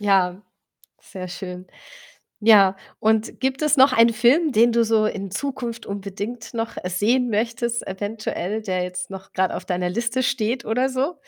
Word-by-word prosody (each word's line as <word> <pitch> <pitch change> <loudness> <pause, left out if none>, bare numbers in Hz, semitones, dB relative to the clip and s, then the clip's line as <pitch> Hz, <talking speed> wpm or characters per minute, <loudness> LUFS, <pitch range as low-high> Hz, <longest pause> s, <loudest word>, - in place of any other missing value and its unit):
Ja, 195 -1 +2 0.6
sehr 185 -1 -8
schön. 180 0 -8 0.7
Ja, 205 -3 +6 0.2
und 220 +1 +1
gibt 265 +1 -1
es 300 -1 +4
noch 265 +1 +7
einen 230 0 +5
Film, 270 +8 +3
den 235 +1 +4
du 235 0 +3
so 220 -1 +2
in 195 -3 -3
Zukunft 240 -2 -4
unbedingt 205 +4 -6
noch, 225 0 -4
äh, 180 - -4
sehen 235 +7 +1
möchtest 235 +2 -1
eventuell, 205 0 -4
der 185 -4 -2
jetzt 180 +9 -5
noch 190 0 -10
grad 185 0 +1
auf - - -5
deiner 180 -1 -1
Liste 235 +6 -1
steht, 240 -1 -1
oder 250 +4 +1
so? 265 +5 -1
220 Hz, 165 wpm, -22 LUFS, 195-240 Hz, 0.7 s, noch